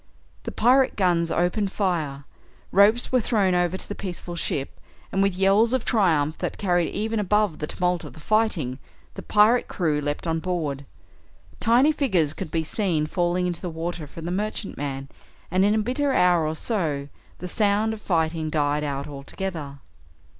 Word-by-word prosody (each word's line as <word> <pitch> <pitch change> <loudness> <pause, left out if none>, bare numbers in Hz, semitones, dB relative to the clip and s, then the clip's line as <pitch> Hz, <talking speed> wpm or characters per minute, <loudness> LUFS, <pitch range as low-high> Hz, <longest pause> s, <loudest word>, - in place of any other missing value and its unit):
The - - -3
pirate 260 +2 +3
guns 175 -4 +2
opened 185 +4 0
fire, 160 -9 -1 0.5
ropes 210 +5 +4
were 255 -1 +3
thrown 205 -5 +2
over 175 +1 +1
to - - -11
the - - -4
peaceful 175 -3 -6
ship, 140 -4 -3 0.3
and 195 - +1
with 195 -2 +2
yells 200 +5 +4
of 260 -3 0
triumph 160 - +2
that - - -3
carried 175 -4 +1
even 220 +2 -2
above 210 -3 +1
the 150 - -3
tumult 180 0 -1
of - - -9
the - - -13
fighting, 170 - 0 0.3
the - - -7
pirate 215 +4 +4
crew 155 -5 0
leapt 145 +2 -3
on 165 -1 0
board. 155 -6 -3 0.7
Tiny 245 +6 +4
figures 190 - +1
could 185 -1 -6
be 160 +1 -1
seen 165 -3 0
falling 175 +2 0
into 175 -2 -3
the 180 - -3
water 165 -1 -5
from 160 +3 -9
the 175 - -2
merchantman, 145 -9 -3 0.4
and 185 +2 +3
in 205 +2 +3
a - - +2
bitter 255 +6 0
hour 175 -8 +3
or 155 - -2
so 155 -9 -2 0.3
the 180 - -6
sound 210 +3 +1
of 215 - -8
fighting 160 -3 0
died 150 -1 0
out 140 -1 -3
altogether. 145 0 -6
180 Hz, 175 wpm, -24 LUFS, 155-210 Hz, 0.7 s, ropes